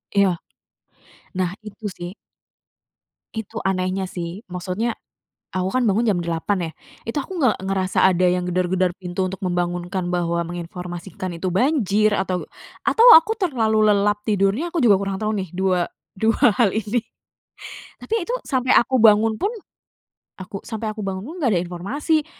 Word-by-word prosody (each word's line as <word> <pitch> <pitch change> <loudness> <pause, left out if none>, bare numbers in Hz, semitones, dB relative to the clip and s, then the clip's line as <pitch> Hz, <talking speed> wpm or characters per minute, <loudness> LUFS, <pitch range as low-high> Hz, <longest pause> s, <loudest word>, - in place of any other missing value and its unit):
Iya, 195 -3 +3 1.0
nah, 180 -2 0 0.2
itu 210 +1 -10
sih. 175 +1 -6 1.2
Itu 220 -3 -6
anehnya 190 0 0
sih. 180 +3 -6
Maksudnya, 185 +6 -3 0.6
aku 185 0 -2
kan 255 - +2
bangun 220 +5 +2
jam 200 -6 +2
8.00 170 +1 -1
ya, - - -11 0.4
itu 265 - -3
aku 345 +5 -3
nge 250 -7 +3
ngerasa 190 -1 +1
ada 185 -1 +3
yang 180 0 0
gedor-gedor 180 0 +1
pintu 180 +1 -2
untuk 185 0 -5
membangunkan 175 0 -2
bahwa 170 -1 0
menginformasikan 175 +1 -6
itu 185 - 0
banjir, 215 - +2
atau 190 -2 -1 0.4
atau 460 - +4
aku 415 +7 +2
terlalu 230 - +1
lelap 205 0 +2
tidurnya, 210 - +1
aku 345 - -4
juga 210 - +4
kurang 195 -1 -2
tahu 215 +1 -1
nih, 190 -4 -3
dua 185 0 0 0.2
dua 220 +2 +1 0.2
hal 225 - +5
ini. 220 +3 -1 1.0
Tapi 445 -4 -2
itu, 470 - -5 0.2
sampai 260 -1 +1
aku 260 +2 0
bangun 220 0 +6
pun, 405 - -1 0.8
aku 190 +1 -7
sampai 220 -1 -3
aku 215 - -9
bangun 190 -1 -3
pun 300 - -8
nggak 275 -8 +1
ada 175 - +1
informasi. 280 - -1
195 Hz, 155 wpm, -22 LUFS, 180-225 Hz, 1.2 s, bangun